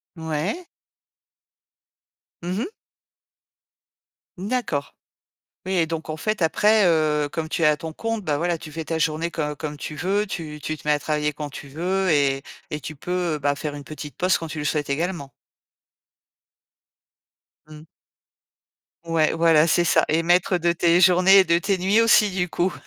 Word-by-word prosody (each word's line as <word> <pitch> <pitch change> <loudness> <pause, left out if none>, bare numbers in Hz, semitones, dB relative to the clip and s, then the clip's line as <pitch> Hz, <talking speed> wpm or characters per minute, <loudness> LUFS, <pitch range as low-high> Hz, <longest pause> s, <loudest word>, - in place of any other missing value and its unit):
Ouais. 160 - -3 1.8
Mmh 180 +4 -2
mh. 340 - -3 1.7
D'accord. 195 - -3 0.7
Oui 190 - -2
et 170 -3 +2
donc, 160 -1 -5
en 155 - -4
fait, 215 +2 -2
après, 210 +5 +3
heu, 155 -3 +2
comme 160 -1 -4
tu - - -2
es - - +5
à 150 0 +4
ton 160 0 -7
compte, 225 0 -3
bah 150 -3 0
voilà, 170 +1 -1
tu 155 -2 -11
fais 160 +1 -6
ta 165 - -2
journée 160 +1 0
co 150 -2 -3
comme 150 0 -6
tu 150 - -6
veux, 195 +6 0
tu 155 -6 -6
tu 155 +1 -4
te 150 - -13
mets 150 - +4
à 145 - 0
travailler 150 0 -1
quand 150 0 -6
tu 140 +1 -10
veux 185 +6 -1
et 140 -2 +2 0.3
et 150 - -3
tu 155 +2 -8
peux, 175 0 -2
bah 145 0 0
faire 145 0 -5
une 145 - -8
petite 150 0 -9
pause 185 +1 +2
quand 165 - -6
tu 155 -1 -6
le 150 - -4
souhaites 150 -1 -1
également? 145 -1 -3 2.4
Mmh. 155 0 -12 1.2
Ouais, 165 -2 +1
voilà, 165 -1 +4
c'est 175 +1 +3
ça. 175 - +3
Et 160 +2 +2
maître 175 +2 +2
de 170 +1 +2
tes 170 +1 +3
journées 185 +2 +6
et 190 - +6
de 170 -1 +2
tes 195 +2 0
nuits 200 +5 +3
aussi, 225 -2 +5
du 185 -1 -1
coup. 175 +2 0
165 Hz, 175 wpm, -23 LUFS, 150-180 Hz, 2.4 s, journées